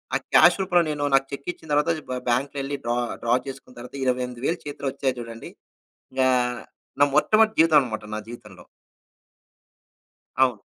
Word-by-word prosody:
ఆ - - +4 0.2
క్యాష్ - - +7
రూపంలో 180 -2 +3
నేను 145 -1 -3
నాకు 135 0 +2
చెక్కిచ్చిన 155 +2 -6
తర్వాత 150 +3 +3 0.2
బ్ 130 - -2
బాంక్‌లో 135 +4 0
యేళ్ళి 140 +1 -4
డ్రా 120 +1 0 0.3
డ్రా 120 +1 +3
చేసుకున్న 135 -2 -10
తర్వాత 125 +2 -10
28 125 -1 -2
వేలు 170 +3 0
చేతిలో 145 -1 -5
వచ్చాయి 130 -1 -2
జూడండి. 115 -1 -8 0.7
గా 130 0 +4 0.7
నా 145 - +7
మొట్టమొదటి 215 +7 +4
జీతమమమాట 135 -10 +2
నా - - -3
జీవితంలో. 105 -5 -11 1.7
అవును. 125 -5 +2
135 Hz, 145 wpm, -24 LUFS, 120-150 Hz, 1.7 s, క్యాష్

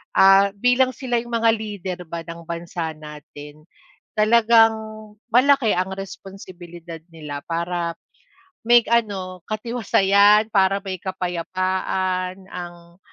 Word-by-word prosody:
ah, 195 +1 +6
bilang 250 +4 +3
sila 245 -4 -2
yung 240 - -12
mga 230 0 +3
leader 205 -4 -6
ba 170 0 -5
ng 170 0 -9
bansa 170 -1 -5
natin, 150 -1 -12 0.6
talagang 225 +1 +5 0.6
malaki 260 -2 +4
ang 185 +1 -1
responsibilidad 180 -3 -10 0.2
nila 150 -3 -7
para 170 0 -3 0.7
may 240 +1 +5
ano 190 -6 -1
katiwasayan, 210 -2 +3
para 195 -1 +3
may 190 -2 -4
kapayapaan 185 +1 -3
ang 175 0 -10
190 Hz, 105 wpm, -21 LUFS, 170-215 Hz, 0.7 s, ah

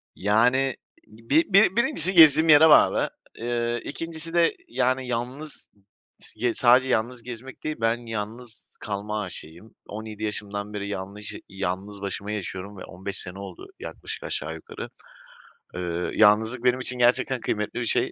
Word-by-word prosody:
Yani, 125 +7 +2 0.3
bir 125 - 0
bir 200 -1 +6
birincisi 235 - +4
gezdiğim 160 -2 +7
yere 155 +1 +8
bağlı. - - +5 0.3
Eee, 120 0 -2
2'ncisi 165 +2 -4
de, 170 -1 +3
yani, 130 +1 0
yalnız 125 +5 -5 0.5
s 120 -1 -3
sadece 125 +2 +4
yalnız 120 +1 -1
gezmek 125 +2 -9
değil, 155 0 -2
ben 115 +1 +2
yalnız 115 +1 -7
kalma 105 +1 -3
aşığıyım. 90 +1 -9
17 110 0 -7
yaşımdan 105 -1 -4
beri 100 -1 -4
yanlış 100 +1 -6 0.2
yalnız 95 +1 -4
başıma 100 +1 -5
yaşıyorum 100 -1 -6
ve - - -10
15 95 +2 -6
sene 90 +1 -8
oldu 375 - -9
yaklaşık - - -8
aşağı - - -4
yukarı. 455 0 -9 0.9
Iıı, 85 0 -3
yalnızlık 110 +3 +4
benim 125 0 +3
için 125 0 -3
gerçekten 125 +1 +2
kıymetli 105 +2 -2
bir 120 - -2
şey, - - +1
115 Hz, 140 wpm, -25 LUFS, 105-130 Hz, 0.9 s, yere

